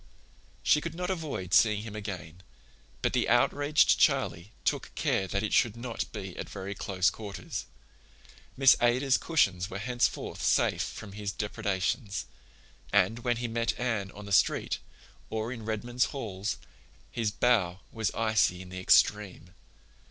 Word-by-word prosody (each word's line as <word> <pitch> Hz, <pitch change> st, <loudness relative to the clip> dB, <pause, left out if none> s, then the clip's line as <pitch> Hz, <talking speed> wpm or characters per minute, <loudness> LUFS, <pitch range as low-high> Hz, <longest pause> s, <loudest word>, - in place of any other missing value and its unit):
She 150 Hz, -, +4 dB
could 165 Hz, 0 st, -5 dB
not 180 Hz, +2 st, -2 dB
avoid 150 Hz, -, -4 dB
seeing 105 Hz, -2 st, +5 dB
him 110 Hz, -1 st, -8 dB
again, 90 Hz, -5 st, -7 dB, 0.6 s
but -, -, +1 dB
the -, -, +1 dB
outraged 145 Hz, +1 st, +4 dB
Charlie 90 Hz, +5 st, +2 dB
took -, -, 0 dB
care 95 Hz, -, 0 dB
that 100 Hz, +2 st, -1 dB
it 105 Hz, -, -2 dB
should 115 Hz, -1 st, +3 dB
not 120 Hz, -1 st, -4 dB
be 95 Hz, -2 st, -6 dB
at -, -, -5 dB
very 100 Hz, 0 st, -5 dB
close 95 Hz, -2 st, +1 dB
quarters. 105 Hz, -3 st, -6 dB, 0.9 s
Miss 135 Hz, 0 st, +7 dB
Ada's 125 Hz, +3 st, +3 dB
cushions 95 Hz, -, +1 dB
were 95 Hz, -, -5 dB
henceforth 120 Hz, +3 st, -1 dB
safe -, -, +2 dB
from 105 Hz, -3 st, -6 dB
his 100 Hz, 0 st, -4 dB
depredations, 100 Hz, +1 st, -2 dB, 0.7 s
and 100 Hz, +3 st, +3 dB
when 120 Hz, 0 st, 0 dB
he 120 Hz, 0 st, -2 dB
met 115 Hz, 0 st, -1 dB
Anne 115 Hz, -6 st, -1 dB
on 105 Hz, 0 st, -10 dB
the 100 Hz, -, -9 dB
street, 95 Hz, -, +2 dB, 0.5 s
or 110 Hz, +2 st, -3 dB
in 115 Hz, -4 st, -7 dB
Redmond's 120 Hz, +3 st, 0 dB
halls, 105 Hz, -6 st, -4 dB, 0.5 s
his 115 Hz, -3 st, 0 dB
bow 100 Hz, -4 st, +1 dB
was 110 Hz, -4 st, -1 dB
icy 110 Hz, -5 st, +2 dB
in 90 Hz, -, -13 dB
the 95 Hz, 0 st, -6 dB
extreme. 95 Hz, -2 st, +2 dB
105 Hz, 150 wpm, -29 LUFS, 95-120 Hz, 0.9 s, Miss